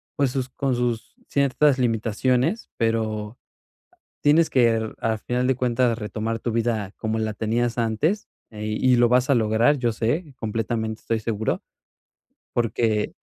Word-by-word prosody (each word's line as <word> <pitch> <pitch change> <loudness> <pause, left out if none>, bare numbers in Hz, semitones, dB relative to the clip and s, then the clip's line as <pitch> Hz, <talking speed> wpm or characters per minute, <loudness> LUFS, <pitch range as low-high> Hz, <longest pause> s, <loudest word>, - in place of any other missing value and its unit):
pues, 140 -5 +1
sus 130 -1 -2
con 135 0 -1
sus 120 -2 -2
ciertas 140 0 +3
limitaciones, 125 - 0
pero 110 -1 -1 0.9
tienes 160 +3 +5
que, 115 -3 +2
al 110 -1 0
final 125 +3 -1
de 130 - +2
cuentas, 120 -1 +1
retomar 110 +1 -3
tu 120 - -2
vida 110 -3 -1
como 110 0 -2
la 110 -1 -1
tenías 115 +3 -1
antes, 145 - 0 0.2
eh, 105 -1 -6
y 125 +4 +2
lo 120 -1 +4
vas 125 +2 +3
a 135 - +5
lograr, 115 +5 +3
yo 120 -2 +1
sé, 140 +8 -1
completamente 110 0 -2
estoy 115 -1 -1
seguro. 110 -1 -2 0.9
Porque 110 -2 0
115 Hz, 145 wpm, -24 LUFS, 110-125 Hz, 0.9 s, tienes